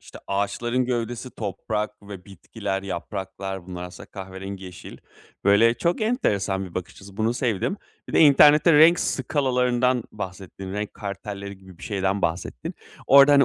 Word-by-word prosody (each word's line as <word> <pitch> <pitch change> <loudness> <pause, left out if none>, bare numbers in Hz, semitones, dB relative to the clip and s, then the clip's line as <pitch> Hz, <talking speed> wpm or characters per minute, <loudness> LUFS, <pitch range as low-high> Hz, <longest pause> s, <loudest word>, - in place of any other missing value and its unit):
işte, - - -13
ağaçların 115 +6 0
gövdesi, 120 0 -3
toprak 105 0 -4
ve 100 -3 -10
bitkiler, 95 0 -5
yapraklar 95 0 -5
bunlar 90 -1 -6
aslında 90 +2 -10
kahverengi, 95 0 -7
yeşil. 90 -1 -10 0.5
Böyle, 115 +4 +5
çok 170 - 0
enteresan 100 - 0
bir 90 - -11
bakış 90 - -4
açısı, 100 0 -14
bunu 110 +2 +1
sevdim. 120 - -1 0.3
Bir - - -7
de - - +4
internette 150 +2 +7
renk 160 +3 +7
skalalarından 125 -2 +1
bahsettin. 95 -1 -7
Renk 105 +1 -4
kartelleri 100 -1 -6
gibi 95 -3 -16
bir - - -16
şeyden 100 -2 -1
bahsettin. 80 -7 -3 0.3
Orada, 140 +1 +8
hani, 140 -1 +7
100 Hz, 145 wpm, -24 LUFS, 95-125 Hz, 0.5 s, Orada